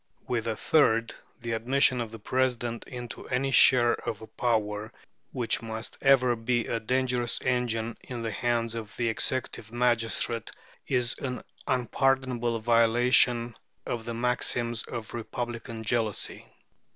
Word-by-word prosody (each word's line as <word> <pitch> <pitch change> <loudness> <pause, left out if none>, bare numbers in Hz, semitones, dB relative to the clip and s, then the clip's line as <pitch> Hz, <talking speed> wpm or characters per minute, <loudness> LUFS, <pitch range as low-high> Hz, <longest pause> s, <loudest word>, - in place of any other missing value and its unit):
With 115 -2 -1
a 110 - 0
third 115 -4 +3 0.3
the 120 -1 -4
admission 125 +2 +2
of 115 - -4
the 115 - -8
President 120 0 -1
into 120 -2 -8
any 135 +2 0
share 120 -2 +6
of 110 - -4
a 110 - -9
power 110 -1 -1 0.4
which 120 -4 0
must 110 0 -5
ever 130 -3 +5
be 120 +1 0
a 115 - -1
dangerous 125 0 0
engine 120 -2 0
in 120 -2 -5
the 115 - -2
hands 115 +1 0
of 110 -2 -7
the 120 -1 +1
executive 115 -1 -2
magistrate 120 -1 0 0.4
is 125 -2 +2
an 125 -2 -4 0.2
unpardonable 125 -1 +1
violation 120 +1 +4 0.3
of 115 -2 -3
the 115 - -4
maxims 120 -1 +1
of 115 -1 -7
republican 120 0 -5
jealousy. 110 -2 -1
120 Hz, 135 wpm, -28 LUFS, 115-125 Hz, 0.4 s, share